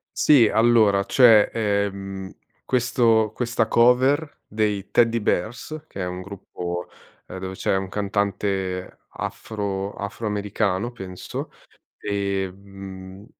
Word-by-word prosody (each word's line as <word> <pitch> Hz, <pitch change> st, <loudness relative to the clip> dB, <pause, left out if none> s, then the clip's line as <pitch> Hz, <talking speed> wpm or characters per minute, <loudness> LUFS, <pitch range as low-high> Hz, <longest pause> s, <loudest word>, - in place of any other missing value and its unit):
Sì, 135 Hz, -7 st, +6 dB
allora, 110 Hz, -3 st, +4 dB
cioè, 115 Hz, -4 st, +6 dB
ehm, 100 Hz, -3 st, -2 dB, 0.4 s
questo 115 Hz, -3 st, +2 dB
questa 115 Hz, -2 st, 0 dB
cover 130 Hz, +7 st, +3 dB
dei 105 Hz, -2 st, -1 dB
Teddybears, 115 Hz, -, 0 dB
che -, -, -8 dB
è 90 Hz, -, -2 dB
un 90 Hz, +1 st, -5 dB
gruppo, 90 Hz, -2 st, -6 dB, 0.4 s
ehm, -, -, -7 dB
dove 95 Hz, 0 st, -5 dB
c'è 95 Hz, -, 0 dB
un 95 Hz, 0 st, -2 dB
cantante 100 Hz, -2 st, -2 dB
afro 100 Hz, -2 st, -4 dB
afroamericano, 105 Hz, 0 st, -2 dB
penso, 95 Hz, -6 st, -7 dB, 0.5 s
ehm, 95 Hz, -1 st, -5 dB
100 Hz, 100 wpm, -23 LUFS, 95-115 Hz, 0.5 s, Sì